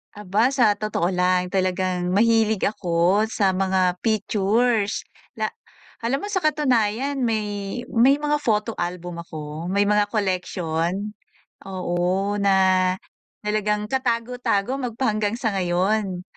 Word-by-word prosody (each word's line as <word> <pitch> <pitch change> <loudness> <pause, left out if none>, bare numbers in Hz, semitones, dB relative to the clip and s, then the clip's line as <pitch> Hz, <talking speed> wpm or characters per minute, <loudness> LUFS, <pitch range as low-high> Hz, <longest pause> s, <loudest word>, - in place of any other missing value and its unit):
Aba. 210 +5 +1
Sa 235 -7 +3
totoo 205 -4 -1
lang 180 0 +1
talagang 185 -1 -1
mahilig 220 0 +3
ako 185 0 +1
sa 190 -4 +1
mga 185 -1 +1
pictures, 215 +1 +1 0.3
na - - +1 0.6
alam 255 +4 0
mo 410 - -5
sa 390 -3 -2
katunayan 270 -3 +1
may, 210 -1 -2
may 265 +5 +4
mga 295 0 +1
photo 215 0 0
album 175 -1 -4
ako, 155 +1 -6
may 200 +1 +2
mga 205 0 +2
collection, 185 -1 -2 0.5
oo 185 +1 -1
na 200 -1 +2 0.9
talagang 210 0 -1
katago-tago 245 -2 -1
magpahanggang 220 -2 -1
sa 220 -5 -1
ngayon. 185 +1 0
205 Hz, 115 wpm, -23 LUFS, 185-225 Hz, 0.9 s, may